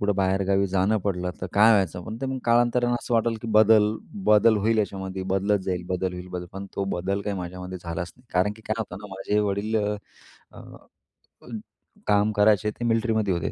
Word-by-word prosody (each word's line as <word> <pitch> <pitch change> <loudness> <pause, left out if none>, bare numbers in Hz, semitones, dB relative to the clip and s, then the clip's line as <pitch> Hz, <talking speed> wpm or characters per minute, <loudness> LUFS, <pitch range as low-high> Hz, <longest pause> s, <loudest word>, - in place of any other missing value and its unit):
कुठं 100 -1 +1
बाहेरगावी 95 0 +1
जाणं 95 +3 +2
पडलं 90 -2 -1
तर 95 - -3
काय 110 +3 +6
व्हायचं, 90 -4 +1
पण 110 - -6
ते 135 - -2
मग 130 0 -3
कालांतराने 120 +1 +3
असं 120 - -2
वाटलं 115 0 +2
की 115 - -5
बदल 110 0 +6 0.4
बदल 105 +1 +5
होईल 110 +2 +1
याच्यामध्ये. 95 -2 -3
बदलत 100 +2 +1
जाईल, 90 -2 -2
बदल 90 0 -1
होईल, 90 0 -8
बदल 90 -1 -5
पण 95 +1 -7
तो 100 - 0
बदल 100 +3 -2
काही 100 -1 -3
माझ्यामध्ये 90 +1 -6
झालाच 85 0 -5
नाही. 125 0 -24
कारण 95 +3 +2
की 110 - -16
काय 110 - 0
होतं 105 -2 -4
ना 105 - -7
माझे 95 +2 -1
वडील 105 +2 -1
अ, 105 0 0 0.6
अ, - - -15 1.0
काम 105 +1 +3
करायचे 105 0 +3
ते 120 - -2
मिलिट्रीमध्ये 110 -3 +1
होते. 85 - -2
100 Hz, 195 wpm, -25 LUFS, 95-110 Hz, 1.0 s, काय